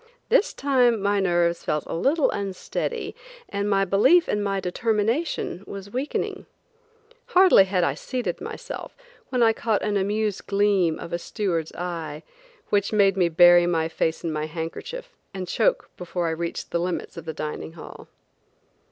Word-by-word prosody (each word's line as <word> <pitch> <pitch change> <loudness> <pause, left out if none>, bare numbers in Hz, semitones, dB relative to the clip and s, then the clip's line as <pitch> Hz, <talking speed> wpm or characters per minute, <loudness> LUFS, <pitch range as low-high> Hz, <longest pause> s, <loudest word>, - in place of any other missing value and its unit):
This 455 -2 +4
time 250 -5 +2
my 200 +1 +1
nerves 175 -2 +1
felt 150 - -1
a - - -6
little 275 - +2
unsteady 200 - -4 0.3
and 200 +1 -2
my 195 -1 +3
belief 210 - +4
in 210 - 0
my 200 -1 -1
determination 220 - -1
was 200 0 -8
weakening, 260 +5 -3 0.9
Hardly 370 - +7
had 185 -2 0
I 140 - +2
seated 215 - -4
myself 445 +1 -7 0.3
when 250 -2 +2
I 225 -1 +5
caught 220 -2 -1
an 205 -1 0
amused 205 +1 -1
gleam 200 -5 +2
of 170 - -8
a 170 - -1
steward's 170 -5 -2
eye, 165 -3 -5 0.5
which 200 -1 +1
made 200 -3 +4
me 180 -3 +2
bury 175 +1 +6
my 165 -2 +1
face 160 0 -2
in 165 -2 -2
my 155 0 -2
handkerchief 170 - -6 0.2
and 185 -1 -4
choke - - +1
before 175 0 -3
I - - 0
reached 170 +1 -4
the 170 - 0
limits 180 +1 -3
of 165 -2 -8
the 160 - -3
dining 155 +1 -5
hall. 165 - -11
195 Hz, 160 wpm, -24 LUFS, 170-220 Hz, 0.9 s, Hardly